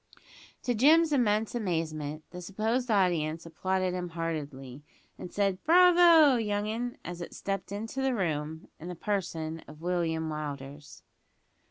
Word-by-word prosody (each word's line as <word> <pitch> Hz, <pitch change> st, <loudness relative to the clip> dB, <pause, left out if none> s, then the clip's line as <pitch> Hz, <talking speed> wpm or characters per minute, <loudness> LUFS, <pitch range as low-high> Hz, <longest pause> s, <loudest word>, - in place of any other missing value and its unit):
To 245 Hz, -, 0 dB
Jim's 310 Hz, +7 st, +5 dB
immense 220 Hz, -4 st, +1 dB
amazement, 160 Hz, -8 st, -3 dB
the 180 Hz, -, -8 dB
supposed 220 Hz, +7 st, -1 dB
audience 170 Hz, -6 st, +1 dB
applauded 185 Hz, +2 st, -1 dB
him 180 Hz, -1 st, -3 dB
heartily; 150 Hz, -5 st, -5 dB, 0.4 s
and 180 Hz, -, -8 dB
said, 195 Hz, -2 st, 0 dB
"Bravyo! 335 Hz, -6 st, +6 dB
young 205 Hz, -1 st, -1 dB
'un," 240 Hz, +3 st, -3 dB
as 175 Hz, 0 st, -6 dB
it 170 Hz, -, -7 dB
stepped 195 Hz, -1 st, -4 dB
into 225 Hz, +6 st, -4 dB
the 265 Hz, -1 st, +1 dB
room, 160 Hz, -5 st, -3 dB
in 165 Hz, -, -8 dB
the 180 Hz, -, -5 dB
person 165 Hz, -5 st, -3 dB
of 150 Hz, 0 st, -12 dB
William 165 Hz, -2 st, -1 dB
Willders. 145 Hz, -2 st, -7 dB
180 Hz, 140 wpm, -29 LUFS, 160-225 Hz, 0.4 s, Bravyo